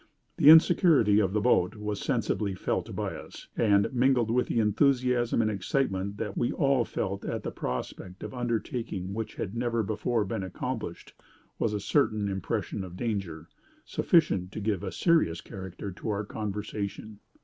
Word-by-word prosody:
The 145 Hz, -, +7 dB
insecurity 160 Hz, -, +6 dB
of 95 Hz, -3 st, +1 dB
the 105 Hz, +1 st, 0 dB
boat 100 Hz, -4 st, +3 dB
was 105 Hz, -1 st, -4 dB
sensibly 110 Hz, -6 st, -1 dB
felt -, -, -2 dB
by -, -, -2 dB
us; -, -, -11 dB
and, 100 Hz, -3 st, +3 dB
mingled 125 Hz, -2 st, +3 dB
with 125 Hz, +1 st, +2 dB
the 115 Hz, -, 0 dB
enthusiasm 120 Hz, +1 st, +2 dB
and 110 Hz, -, +1 dB
excitement 100 Hz, -1 st, -1 dB
that 105 Hz, -2 st, -4 dB
we 120 Hz, -, 0 dB
all 135 Hz, -4 st, +2 dB
felt 100 Hz, 0 st, -3 dB
at -, -, -3 dB
the -, -, -3 dB
prospect 90 Hz, +9 st, -5 dB
of -, -, -6 dB
an 125 Hz, -, -6 dB
undertaking 115 Hz, -5 st, -3 dB
which 110 Hz, +1 st, -4 dB
had 100 Hz, +3 st, -4 dB
never 115 Hz, -1 st, 0 dB
before 110 Hz, +1 st, -1 dB
been 95 Hz, -, -3 dB
accomplished, 95 Hz, -1 st, -5 dB, 0.5 s
was 115 Hz, -, +1 dB
a 105 Hz, -, -2 dB
certain 110 Hz, -4 st, +1 dB
impression 95 Hz, 0 st, -3 dB
of 90 Hz, -1 st, -9 dB
danger, 95 Hz, -9 st, -3 dB, 0.4 s
sufficient 95 Hz, -, +2 dB
to -, -, -4 dB
give 100 Hz, -3 st, -1 dB
a 95 Hz, -, -4 dB
serious 160 Hz, -, +2 dB
character 95 Hz, +3 st, -7 dB
to 105 Hz, +4 st, -6 dB
our 105 Hz, 0 st, -1 dB
conversation. 105 Hz, 0 st, -5 dB
105 Hz, 165 wpm, -28 LUFS, 95-120 Hz, 0.5 s, The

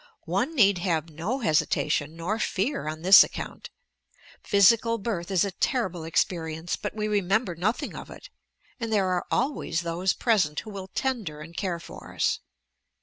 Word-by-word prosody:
One 200 Hz, -, -1 dB
need 200 Hz, -, +4 dB
have 165 Hz, -3 st, -1 dB
no 195 Hz, -, -3 dB
hesitation 155 Hz, -3 st, +1 dB
nor 180 Hz, +7 st, -2 dB
fear 210 Hz, -, -1 dB
on 155 Hz, +1 st, -5 dB
this 190 Hz, +2 st, +10 dB
account. -, -, -7 dB, 0.7 s
Physical 230 Hz, +3 st, +4 dB
birth 200 Hz, -5 st, -3 dB
is 190 Hz, -1 st, +2 dB
a 200 Hz, -, -3 dB
terrible 185 Hz, -5 st, -1 dB
experience, 160 Hz, 0 st, -1 dB
but -, -, -6 dB
we 215 Hz, -1 st, -2 dB
remember 200 Hz, -1 st, +1 dB
nothing 190 Hz, +8 st, -2 dB
of -, -, -8 dB
it; -, -, -12 dB, 0.5 s
and 230 Hz, -2 st, -3 dB
there 195 Hz, -3 st, +2 dB
are 180 Hz, -1 st, -1 dB
always 240 Hz, -, -1 dB
those 170 Hz, +3 st, 0 dB
present 190 Hz, -, +1 dB
who 215 Hz, -, -10 dB
will 195 Hz, -2 st, -7 dB
tender 225 Hz, -, -2 dB
and 165 Hz, +2 st, -11 dB
care 180 Hz, -3 st, -2 dB
for -, -, -11 dB
us. -, -, +1 dB
190 Hz, 160 wpm, -26 LUFS, 165-220 Hz, 0.7 s, this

